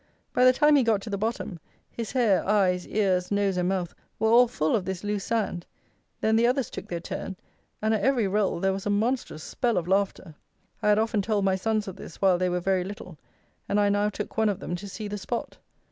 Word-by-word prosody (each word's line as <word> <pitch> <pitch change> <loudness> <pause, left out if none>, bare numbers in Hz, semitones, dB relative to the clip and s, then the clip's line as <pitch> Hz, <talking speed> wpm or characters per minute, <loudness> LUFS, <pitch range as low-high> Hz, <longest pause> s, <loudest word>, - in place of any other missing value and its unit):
By 250 - +4
the 255 - +8
time 300 +3 +4
he - - +5
got 225 -4 +2
to 220 - -7
the 200 - -1
bottom, 215 -5 -3 0.3
his 230 -2 -5
hair, 230 -7 +3
eyes, 185 -4 +2
ears, 185 -4 +1
nose, 200 -2 +1
and 180 0 0
mouth, 185 -3 -2 0.2
were 220 0 +2
all 245 +1 +7
full 155 -8 0
of 205 - 0
this 190 0 -5
loose 205 -1 -2
sand; 210 -6 -2 0.5
then 220 0 +2
the 230 +1 +4
others 255 0 0
took - - -7
their 170 - -3
turn, 190 +2 -5 0.5
and 220 +1 +2
at 215 - 0
every 240 -2 +2
roll 195 -2 0
there 195 +2 +1
was 195 +1 -4
a - - +1
monstrous 215 -5 -1
spell 235 -5 -1
of 175 -1 -1
laughter. 190 -3 0 0.5
I 210 - +2
had 210 - +5
often 220 -1 +1
told 205 -1 0
my 190 -1 +3
sons 215 +2 -1
of 190 0 -7
this - - -11
while 185 -3 +3
they 185 0 +1
were 180 0 0
very 185 0 +1
little, 185 -4 -9 0.5
and 205 - +2
I 205 0 +3
now 205 +1 +2
took 210 - -6
one 220 -1 +3
of 200 - -2
them 175 - -4
to 200 +2 -8
see 210 +2 -6
the 205 0 -5
spot. 235 +5 -5
205 Hz, 240 wpm, -26 LUFS, 190-220 Hz, 0.5 s, the